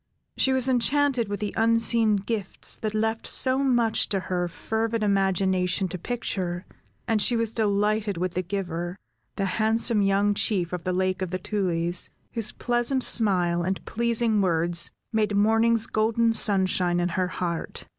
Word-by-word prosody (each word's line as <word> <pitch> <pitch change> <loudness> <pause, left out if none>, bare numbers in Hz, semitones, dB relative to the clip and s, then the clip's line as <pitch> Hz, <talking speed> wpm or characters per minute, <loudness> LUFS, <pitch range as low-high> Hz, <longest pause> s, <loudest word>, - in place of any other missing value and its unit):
She 265 - +2
was 260 -1 +2
enchanted 260 -1 +2
with 205 +1 -4
the 210 - -3
unseen 230 -1 +3
gifts 205 0 -3
that 215 -1 -3
left 220 +1 -1
so 260 0 +3
much 240 -5 +2
to 195 - 0
her 180 -1 -2
fervid 220 +5 -2
imagination 190 -1 +1
to 185 - -5
picture, 185 -5 -3 0.4
and 225 -2 +1
she 240 - +2
was 230 -1 -1
delighted 210 -1 0
with 180 0 -2
the 185 - -1
giver, 175 -1 -4 0.4
the 195 - -1
handsome 220 +2 +1
young 200 +1 +2
Chief 185 -4 -1
of 175 -2 -5
the 185 - 0
Lake 185 +1 -1
of 185 - -2
the 185 - -2
Tulies, 175 -3 -1 0.2
whose 225 -2 -1
pleasant 245 +2 0
smile, 180 -6 +2
and 190 +2 -3
pleasing 230 -2 +1
words, 170 -1 +1 0.2
made 215 -2 +1
morning's 225 +2 +3
golden 225 +1 +1
sunshine 185 -4 +1
in 175 0 0
her 180 +1 -1
heart. 175 -2 -4
205 Hz, 155 wpm, -25 LUFS, 185-225 Hz, 0.4 s, unseen